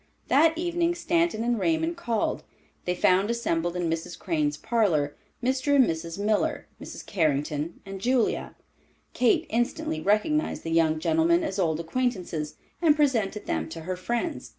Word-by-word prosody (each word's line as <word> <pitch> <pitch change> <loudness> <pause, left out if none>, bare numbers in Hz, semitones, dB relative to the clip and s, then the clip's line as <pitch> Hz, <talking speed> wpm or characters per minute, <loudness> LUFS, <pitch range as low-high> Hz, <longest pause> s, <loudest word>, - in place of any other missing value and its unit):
That 320 +3 +4
evening 345 0 0
Stanton 340 -8 +1
and 240 -1 0
Raymond 325 +3 +1
called. 235 -10 -1 0.4
They 180 - 0
found 185 +3 +3
assembled 175 -7 -1
in 175 -1 -1
Mrs. 165 +1 -3
Crane's 150 -5 -1
parlor, 165 -9 +1 0.3
Mr. 260 +3 +1
and 265 -3 +6
Mrs. 165 -1 -4
Miller, 210 +1 0 0.2
Mrs. - - -8
Carrington 150 -2 -1
and 195 -1 -7
Julia. 250 +1 0 0.6
Kate 245 -2 +3
instantly 225 -8 -1
recognized 215 - +1
the 165 - -4
young 160 -1 +3
gentlemen 325 - +2
as 195 -10 -3
old 160 -4 +1
acquaintances, 175 -6 -2 0.3
and 315 -4 +5
presented 230 -9 +1
them 80 0 -2
to 165 - -7
her 185 +3 -3
friends. 240 - -3
210 Hz, 150 wpm, -26 LUFS, -, 0.6 s, and